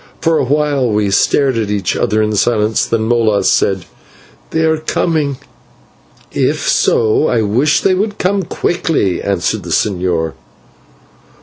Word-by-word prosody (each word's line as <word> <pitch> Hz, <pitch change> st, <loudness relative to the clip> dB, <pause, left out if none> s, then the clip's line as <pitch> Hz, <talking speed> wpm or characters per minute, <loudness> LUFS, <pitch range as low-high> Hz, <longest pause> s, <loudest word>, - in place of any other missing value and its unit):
For 165 Hz, -1 st, +1 dB
a -, -, +1 dB
while 145 Hz, -1 st, 0 dB
we 105 Hz, -2 st, 0 dB
stared 130 Hz, +4 st, +2 dB
at 105 Hz, -2 st, -2 dB
each 100 Hz, -3 st, -1 dB
other 110 Hz, +1 st, +1 dB
in 105 Hz, 0 st, -1 dB
silence, 110 Hz, 0 st, +1 dB
then 115 Hz, -1 st, 0 dB
Molas 110 Hz, -3 st, +2 dB
said, 95 Hz, -3 st, 0 dB, 0.6 s
"They 160 Hz, -, -1 dB
are 160 Hz, -1 st, +1 dB
coming." 155 Hz, -3 st, -1 dB, 0.9 s
"If -, -, -1 dB
so 115 Hz, +7 st, +2 dB
I 115 Hz, -2 st, +1 dB
wish 130 Hz, +9 st, +1 dB
they 190 Hz, -, +2 dB
would 205 Hz, +3 st, -2 dB
come 195 Hz, +2 st, 0 dB
quickly," 165 Hz, -, -1 dB
answered 100 Hz, -3 st, -1 dB
the -, -, -9 dB
señor. 90 Hz, -5 st, -1 dB
115 Hz, 140 wpm, -15 LUFS, 105-155 Hz, 0.9 s, stared